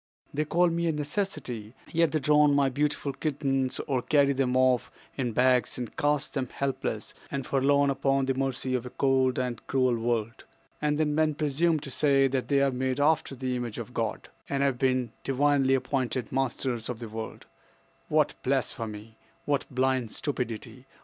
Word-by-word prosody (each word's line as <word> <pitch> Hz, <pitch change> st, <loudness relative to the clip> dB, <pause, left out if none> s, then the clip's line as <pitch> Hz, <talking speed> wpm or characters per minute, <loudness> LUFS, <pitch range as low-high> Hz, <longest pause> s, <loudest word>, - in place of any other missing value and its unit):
"They 155 Hz, +2 st, 0 dB
call 175 Hz, +3 st, +3 dB
me 170 Hz, 0 st, 0 dB
a -, -, +3 dB
necessity, 145 Hz, -, -4 dB, 0.2 s
yet 165 Hz, 0 st, +3 dB
they 155 Hz, -, +1 dB
drown 150 Hz, 0 st, +4 dB
my 140 Hz, -1 st, +3 dB
beautiful 145 Hz, +1 st, -1 dB
kittens, 135 Hz, -4 st, -1 dB
or 130 Hz, -3 st, -1 dB
carry 140 Hz, +2 st, +3 dB
them 130 Hz, -1 st, +1 dB
off 130 Hz, -2 st, +3 dB, 0.3 s
in 125 Hz, -3 st, -1 dB
bags 125 Hz, 0 st, +2 dB
and 120 Hz, -3 st, -5 dB
cast 145 Hz, -1 st, 0 dB
them 130 Hz, -4 st, -2 dB
helpless 140 Hz, -1 st, -3 dB, 0.2 s
and 135 Hz, -2 st, -3 dB
forlorn 140 Hz, +1 st, +3 dB
upon 135 Hz, 0 st, +1 dB
the 135 Hz, -, +1 dB
mercy 130 Hz, -1 st, -2 dB
of 125 Hz, -2 st, 0 dB
a 125 Hz, -, -7 dB
cold 130 Hz, -1 st, +2 dB
and 125 Hz, -3 st, -2 dB
cruel 130 Hz, -2 st, +2 dB
world. 115 Hz, 0 st, -2 dB, 0.4 s
And 150 Hz, 0 st, +1 dB
then 150 Hz, -1 st, +1 dB
men 155 Hz, 0 st, +2 dB
presume 155 Hz, +2 st, +1 dB
to 140 Hz, -, -7 dB
say 135 Hz, 0 st, +3 dB
that 130 Hz, -1 st, -1 dB
they 140 Hz, -1 st, +3 dB
are 135 Hz, -, +2 dB
made 130 Hz, +1 st, -1 dB
after 150 Hz, -1 st, +2 dB
the 130 Hz, 0 st, -2 dB
image 120 Hz, -3 st, -4 dB
of 120 Hz, +1 st, -7 dB
God, 115 Hz, -3 st, -3 dB, 0.2 s
and 140 Hz, 0 st, +1 dB
have 135 Hz, -3 st, +1 dB
been 130 Hz, -3 st, +1 dB
divinely 135 Hz, 0 st, +3 dB
appointed 130 Hz, -3 st, -2 dB
masters 130 Hz, -3 st, -1 dB
of 125 Hz, -, -3 dB
the 115 Hz, 0 st, -7 dB
world! 110 Hz, +1 st, -7 dB, 0.6 s
What -, -, +3 dB
blasphemy! 110 Hz, 0 st, -3 dB, 0.3 s
What 145 Hz, -1 st, 0 dB
blind 130 Hz, -3 st, 0 dB
stupidity! 125 Hz, -2 st, -4 dB
135 Hz, 175 wpm, -28 LUFS, 125-145 Hz, 0.6 s, drown